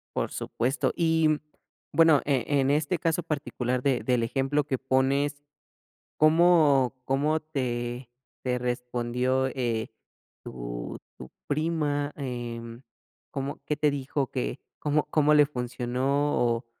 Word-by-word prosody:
Por - - -1
supuesto, 125 +4 -1
y, 160 -2 +3
mm, 155 -1 +1 0.5
bueno, 160 -4 +6
eh, 135 -5 +1
en 140 -2 +2
este 150 +4 +1
caso 165 +2 0
particular 130 -5 -2
de 135 -3 +2
del 125 -2 +1
ejemplo 135 +4 0
que 135 -2 -1
pones, 135 +2 +1 0.8
¿cómo 155 -5 +5
cómo 150 +4 +1
te 125 -5 -3 0.3
te 125 -1 0
respondió, 125 +1 -1
eh, 120 -4 -2 0.5
tu - - -6 0.2
tu 65 - -10 0.2
prima?, 150 -1 0
em, 120 -3 -6 0.5
¿cómo 140 0 -4
qué 150 - 0
te 150 0 +3
dijo 140 -1 -2
que 130 0 -3 0.2
cómo 150 0 +1
cómo 150 -1 +4
le 150 -1 +6
funcionó 130 +2 -1
o 120 0 +1
135 Hz, 125 wpm, -27 LUFS, 125-150 Hz, 0.8 s, bueno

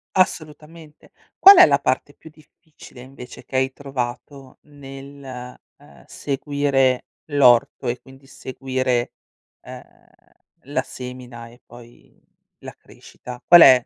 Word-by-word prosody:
Assolutamente. 155 -3 -3 0.3
Qual 395 +1 +10
è 365 - +10
la - - +2
parte - - -2
più 160 - -16
difficile, 155 -3 -19
invece, 125 -1 -13
che 130 - -10
hai 130 0 +1
trovato 135 0 -7
nel, 135 -3 -11 0.2
uhm, 70 -3 -20
seguire 140 -2 -1 0.2
l'orto 130 -6 +3
e, 120 +1 -2
quindi, 135 +1 -18
seguire, 130 -2 -3 0.5
uhm, - - -11 0.8
la 145 +2 -2
semina 125 -2 -10
e 120 +2 -19
poi 120 0 -18 0.4
la - - -11
crescita? 125 -1 -13
Qual 175 0 +9
è 130 -4 +7
135 Hz, 115 wpm, -21 LUFS, 125-145 Hz, 0.8 s, Qual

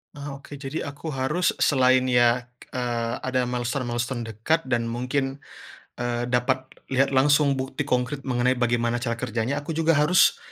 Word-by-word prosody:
Ah, 145 -1 -6
oke. 140 +1 -11
Jadi 140 +3 -4
aku 145 +3 -7
harus 150 +5 0
selain, 130 -2 +4
ya, 120 -1 +3 0.3
eee, 120 -2 -1
ada 130 -1 0
milestone-milestone 120 -1 -2
dekat 115 +9 0
dan 120 -2 +1
mungkin, 130 +4 -2 0.6
eee, 120 0 -1
dapat 130 +1 0 0.2
lihat 135 +1 +2
langsung 140 +1 +3
bukti 135 +2 -3
kongkrit 130 +1 -1
mengenai 125 -1 +1
bagaimana 120 -1 0
cara 115 -2 -2
kerjanya, 120 +3 -1
aku 145 +3 -5
juga 165 +1 +1
harus 150 +5 +4
130 Hz, 150 wpm, -25 LUFS, 120-140 Hz, 0.6 s, selain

